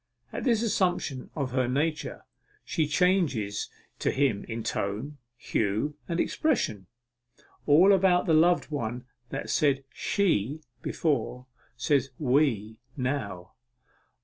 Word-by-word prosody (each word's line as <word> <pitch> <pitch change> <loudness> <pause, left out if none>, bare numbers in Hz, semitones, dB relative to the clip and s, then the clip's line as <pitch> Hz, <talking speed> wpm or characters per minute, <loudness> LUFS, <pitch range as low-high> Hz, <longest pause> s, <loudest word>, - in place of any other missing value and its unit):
At - - -4
this 235 -3 +3
assumption 180 - 0
of 140 -5 -2
her 130 -1 +1
nature, 150 +4 -1 0.4
she 155 -2 0
changes 150 - +1 0.3
to - - +1
him 130 -7 +1
in 115 0 -5
tone, 110 +12 -3 0.2
hue, 110 +7 -1
and 170 0 -1
expression. 110 - 0 0.8
All 175 +7 +7
about 185 -2 +4
the 165 - +2
loved 170 +1 +4
one 120 -3 -3 0.2
that - - -4
said 140 -2 +2
'She' 155 - 0 0.2
before, 125 -5 -1 0.3
says 135 +2 +1
'We' 125 -6 +1 0.2
now. 125 -9 -3
140 Hz, 115 wpm, -28 LUFS, 115-165 Hz, 0.8 s, All